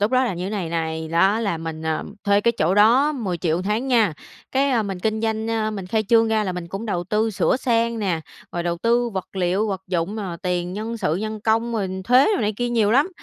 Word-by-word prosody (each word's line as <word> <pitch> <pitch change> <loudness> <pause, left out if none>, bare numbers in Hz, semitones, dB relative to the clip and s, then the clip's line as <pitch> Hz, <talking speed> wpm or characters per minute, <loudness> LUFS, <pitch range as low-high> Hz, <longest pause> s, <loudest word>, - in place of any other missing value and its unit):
Lúc 205 +2 +2
đó 255 0 +3
là 235 - -1
như 175 +1 -4
thế - - -4
này 195 -6 -3
này, 160 -1 -3
đó 190 +7 +3
là 200 -7 -1
mình, 160 -1 -6
à, 160 -1 -1 0.2
thuê 200 0 +4
cái 235 +3 +2
chỗ 170 +4 +2
đó 240 +9 +5
10.000.000 180 - -1
một 180 - -3
tháng 215 +7 -1
nha, 225 -8 +3 0.4
cái, 275 +1 +2
a, 235 -4 +2
mình 195 -3 -5
kinh 220 +2 -1
doanh, 220 0 -1
ơ, 220 -1 0
mình 195 -4 -5
khai 215 +3 0
trương 225 -1 +5
ra 220 -1 +1
là 185 - -2
mình 180 -1 -6
cũng 195 +6 -5
đầu 175 -5 -2
tư 215 +4 0
sửa 215 - +1
sang 235 -2 0
nè, 185 -6 -1 0.3
rồi 175 - -2
đầu 170 0 -2
tư 235 +3 +2
vật 195 -2 -6
liệu, 190 +4 +1
vật 190 -2 -3
dụng, 180 +3 -2
ờ, 190 -5 -4
tiền 180 -1 -1
nhân 220 +4 -4
sự 155 -8 0
nhân 215 +2 -4
công 225 +2 +1
rồi 205 -4 -1 0.2
thuế 250 +5 +5
đồ - - -1
này 210 -1 0
kia 245 0 -1
nhiều 225 -3 +2
lắm, 275 +9 +4
210 Hz, 260 wpm, -22 LUFS, 180-230 Hz, 0.4 s, đó